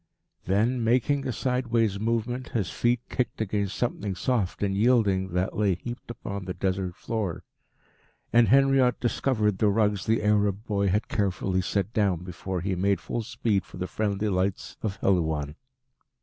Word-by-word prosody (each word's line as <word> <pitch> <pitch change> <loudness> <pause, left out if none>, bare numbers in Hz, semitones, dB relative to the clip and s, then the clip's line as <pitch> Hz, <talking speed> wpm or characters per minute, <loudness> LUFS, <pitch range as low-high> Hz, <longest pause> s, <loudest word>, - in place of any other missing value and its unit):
Then, 115 +6 +1
making 130 +4 +2
a - - 0
sideways 120 -5 0
movement, 115 +3 -1
his 105 -6 -1
feet 120 0 +1
kicked 125 - -2
against 100 -2 -1
something 105 -5 -2
soft 105 -4 -1
and 100 -1 0
yielding 105 -4 +3
that 90 +1 0
lay 100 -3 +2
heaped 120 +7 -8
upon 100 -4 -6
the 90 - -4
Desert 95 -2 -1
floor, 105 -7 -3 0.9
and 120 -1 +6
Henriot 135 -1 +4
discovered 110 -5 0
the 105 - +4
rugs 105 -2 +1
the 110 0 +2
Arab 105 0 +2
boy 100 -2 0
had 100 +3 +1
carefully 95 -2 0
set 100 +3 -1
down 95 -6 +1
before 90 0 -4
he 95 +2 -1
made 95 +1 +1
full 120 - -3
speed 105 -3 -1
for - - -12
the 90 - -2
friendly 105 +1 -1
lights 95 0 -1
of 105 -3 -2
Helouan. 80 -6 +1
105 Hz, 160 wpm, -27 LUFS, 95-115 Hz, 0.9 s, and